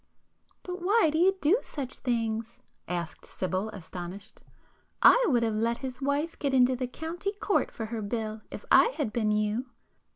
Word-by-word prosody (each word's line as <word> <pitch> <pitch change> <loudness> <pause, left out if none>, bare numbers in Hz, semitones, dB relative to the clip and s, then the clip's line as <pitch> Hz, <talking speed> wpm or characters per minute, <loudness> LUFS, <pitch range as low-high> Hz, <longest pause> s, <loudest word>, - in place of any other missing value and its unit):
"But 360 0 -6
why 400 -1 +4
do 315 - 0
you 385 +2 +4
do 340 +11 +4
such 270 -3 -5
things?" 225 -2 -2 0.3
asked 175 -2 -4
Sibyl 190 +3 -3
astonished; 190 +2 -8 0.6
"I - - +8
would 240 -7 +3
have 225 -1 +1
let 230 +2 0
his 255 0 -6
wife 285 +4 -1
get 275 -2 0
into 255 0 +5
the 250 0 -2
County 340 +9 -4
Court 410 -1 0
for 225 - -5
her 220 0 -4
bill, 215 0 -3
if - - -8
I - - +8
had 275 -9 -1
been 220 -3 +1
you!" 215 +4 0
240 Hz, 170 wpm, -28 LUFS, 215-310 Hz, 0.6 s, I